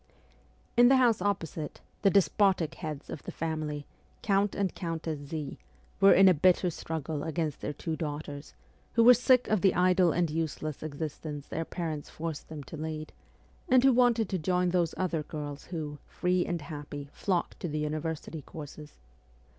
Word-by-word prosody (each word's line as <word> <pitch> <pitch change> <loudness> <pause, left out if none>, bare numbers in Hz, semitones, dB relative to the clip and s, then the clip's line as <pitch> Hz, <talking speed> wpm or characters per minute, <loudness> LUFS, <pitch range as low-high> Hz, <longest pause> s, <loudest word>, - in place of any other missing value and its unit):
In 240 0 +7
the 270 - +6
house 240 -4 +4
opposite, 165 -7 -2 0.2
the 195 - +5
despotic 190 -2 +3
heads 155 -4 -6
of 145 - -6
the - - -7
family, 155 -3 -3 0.4
Count 200 -1 +2
and 195 -3 0
Countess 165 -3 -3
Z, 145 0 -6 0.4
were 195 0 +7
in 195 +1 +7
a 185 - +7
bitter 180 +2 +3
struggle 155 -2 -4
against 160 -1 -2
their - - -2
two 160 +2 -3
daughters, 145 -2 -6 0.4
who 230 - +5
were 250 +2 +10
sick 250 +1 +4
of 215 -4 +2
the 195 -2 +4
idle 180 -1 +4
and 170 0 +1
useless 155 -1 -3
existence 150 -1 -5
their 165 - -3
parents 160 -4 -4
forced 160 -2 -5
them 155 -2 -7
to 160 - -9
lead, 155 0 -5 0.6
and 255 0 +6
who 270 -1 +6
wanted 240 -2 +4
to 190 - -1
join 180 +2 +1
those 175 -2 +1
other 180 -4 0
girls 145 -1 -6
who, 150 -4 -5
free 180 0 0
and 170 -3 -2
happy, 145 -2 -7
flocked 180 -4 -1
to - - -3
the 155 -1 -3
university 155 +1 -3
courses. 150 +1 -10
160 Hz, 170 wpm, -29 LUFS, 150-185 Hz, 0.6 s, were